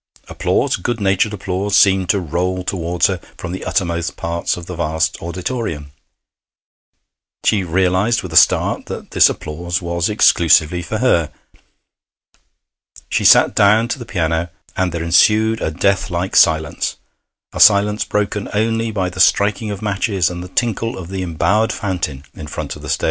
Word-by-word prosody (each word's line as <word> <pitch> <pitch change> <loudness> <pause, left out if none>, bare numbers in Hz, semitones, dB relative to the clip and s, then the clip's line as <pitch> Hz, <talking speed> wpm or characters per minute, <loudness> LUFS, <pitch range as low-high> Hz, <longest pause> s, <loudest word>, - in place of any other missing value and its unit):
Applause - - -1
good 115 +5 -3
natured 100 +1 +1
applause 100 0 -2
seemed 95 -3 +4
to 100 - +2
roll 90 +2 -2
towards 90 -2 -1
her 95 -2 0 0.2
from 90 - -6
the 95 - -6
uttermost 85 -2 -2
parts 85 +1 -2
of 85 - -8
the 90 - -7
vast 80 -1 -1
auditorium. 85 - -5 1.5
She 100 -3 +2
realized 95 +5 +1
with 90 -3 -7
a - - +4
start - - +3
that - - -8
this - - +5
applause 85 +2 -4
was 85 +1 -2
exclusively 85 -4 +3
for 100 +6 -4
her. 85 -11 +1 1.8
She - - 0
sat - - +6
down 105 +3 +4
to 140 - -3
the 120 - -8
piano, 80 -4 -2 0.3
and 95 -1 0
there 85 0 -4
ensued 110 +6 +3
a - - -1
death 100 +4 0
like 90 +2 -3
silence 80 -2 +2 0.6
a - - -6
silence 105 0 +4
broken 105 0 -2
only 115 +2 0
by 95 -4 -2
the 95 +1 -10
striking 105 +3 +2
of 100 - -6
matches 100 -3 0
and 90 0 -6
the 90 - -8
tinkle 115 +3 -2
of 90 -2 -8
the 95 -1 -4
embowered 100 +6 0
fountain 90 - -4
in 75 - -9
front - - -6
of - - -13
the - - -9
stage. - - -1
95 Hz, 165 wpm, -18 LUFS, 85-105 Hz, 1.8 s, sat